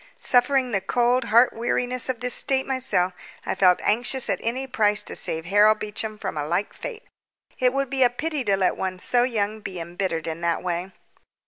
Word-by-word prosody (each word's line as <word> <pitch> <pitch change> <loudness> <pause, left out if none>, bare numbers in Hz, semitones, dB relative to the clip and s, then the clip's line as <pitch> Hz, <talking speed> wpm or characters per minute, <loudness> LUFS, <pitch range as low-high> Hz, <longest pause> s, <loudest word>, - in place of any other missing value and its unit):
Suffering 255 0 +3
the 200 -3 0
cold 245 +4 +1
heart 235 +4 +4
weariness 245 +2 -1
of 250 -2 -3
this 250 0 -2
state 265 -1 +1
myself, 260 -9 +1 0.3
I - - -1
felt 180 -2 +4
anxious 245 +4 0
at - - -1
any 250 +4 -2
price 215 -5 +1
to - - -5
save 160 0 -1
Harold 205 +4 +4
Beecham 215 +1 -5
from 190 -6 -5
a 145 0 -2
like 175 +5 -1
fate. 465 -1 -8 0.6
It 250 -1 +3
would 275 0 -2
be 270 -1 -1
a 250 - +6
pity 295 +3 -3
to 195 -1 +2
let 190 -1 +1
one 185 -1 -3
so 240 +6 +2
young 220 -3 -1
be 190 -4 -7
embittered 170 -1 -3
in 165 +1 -5
that 170 0 -1
way. 180 +1 -3
220 Hz, 200 wpm, -24 LUFS, 190-250 Hz, 0.6 s, a